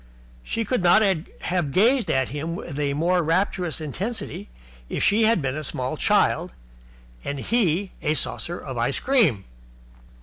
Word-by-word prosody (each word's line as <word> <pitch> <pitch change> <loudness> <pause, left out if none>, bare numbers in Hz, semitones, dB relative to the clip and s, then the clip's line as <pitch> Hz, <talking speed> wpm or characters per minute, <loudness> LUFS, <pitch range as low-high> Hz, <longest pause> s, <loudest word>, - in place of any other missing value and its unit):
She 225 - -3
could 250 0 0
not 180 +5 +5
have 180 -3 -1
gazed 235 - +3
at 130 -1 +1
him 155 +4 -4
with 155 -4 -6
a 140 -1 0
more 175 +4 +2
rapturous 175 0 0
intensity 180 - -5 0.4
if - - -2
she 215 +2 +4
had 220 -8 +3
been 135 0 -1
a 155 - -4
small 130 -2 -2
child - - +2 0.7
and 140 - -3
he 195 - +1
a 155 - +1
saucer 175 +3 -3
of 130 -3 -6
ice 125 +4 0
cream. 205 - +2
170 Hz, 155 wpm, -24 LUFS, 145-205 Hz, 0.7 s, not